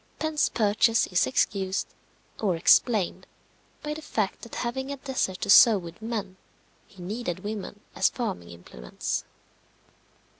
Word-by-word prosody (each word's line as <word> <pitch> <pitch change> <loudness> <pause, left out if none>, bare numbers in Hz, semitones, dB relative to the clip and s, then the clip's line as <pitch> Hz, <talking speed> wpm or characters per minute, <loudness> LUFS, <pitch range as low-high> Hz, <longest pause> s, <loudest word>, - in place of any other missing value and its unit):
Penn's 315 -1 0
purchase 225 +1 +2
is 180 -1 +1
excused, 195 -6 -1 0.5
or 195 -5 +1
explained, 200 +3 +3 0.6
by 300 0 -3
the 310 - -8
fact 215 -9 -2
that 235 - -9
having 265 +3 -3
a 280 - -4
desert 255 -9 -2
to - - -3
sow 220 0 +8
with 170 +2 -9
men, 210 -4 -4 0.5
he 185 -3 -13
needed 200 -2 -4
women 205 0 -6
as - - +3
farming 150 - -4
implements. 75 -8 -5
210 Hz, 135 wpm, -26 LUFS, 185-240 Hz, 0.6 s, sow